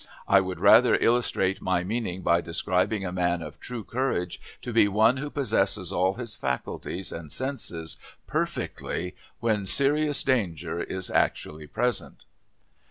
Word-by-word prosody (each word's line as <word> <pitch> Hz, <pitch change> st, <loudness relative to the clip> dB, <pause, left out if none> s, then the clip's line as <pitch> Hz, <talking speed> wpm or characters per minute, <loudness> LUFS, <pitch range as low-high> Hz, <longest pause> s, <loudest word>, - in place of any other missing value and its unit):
I 100 Hz, 0 st, +6 dB
would 95 Hz, -2 st, -4 dB
further 115 Hz, +7 st, +7 dB
illustrate 115 Hz, -5 st, +1 dB
my 90 Hz, -1 st, +1 dB
meaning 95 Hz, -2 st, -3 dB
by 85 Hz, 0 st, +3 dB
describing 95 Hz, +4 st, 0 dB
a 90 Hz, -, -3 dB
man 90 Hz, -1 st, 0 dB
of -, -, -9 dB
true 120 Hz, -3 st, -6 dB
courage 115 Hz, -9 st, -2 dB, 0.2 s
to 120 Hz, -, -4 dB
be 110 Hz, -2 st, +6 dB
one 110 Hz, +5 st, +4 dB
who 145 Hz, +2 st, -4 dB
possesses 105 Hz, -, 0 dB
all 95 Hz, +2 st, +2 dB
his 120 Hz, -3 st, -6 dB
faculties 85 Hz, +7 st, -3 dB
and 80 Hz, -3 st, -7 dB
senses 85 Hz, -, -4 dB, 0.3 s
perfectly 90 Hz, +1 st, -3 dB, 0.3 s
when 105 Hz, -4 st, +1 dB
serious 145 Hz, +4 st, +2 dB
danger 85 Hz, -, 0 dB
is 95 Hz, 0 st, -4 dB
actually 75 Hz, 0 st, 0 dB
present. 125 Hz, +9 st, -2 dB
95 Hz, 140 wpm, -27 LUFS, 90-120 Hz, 0.3 s, further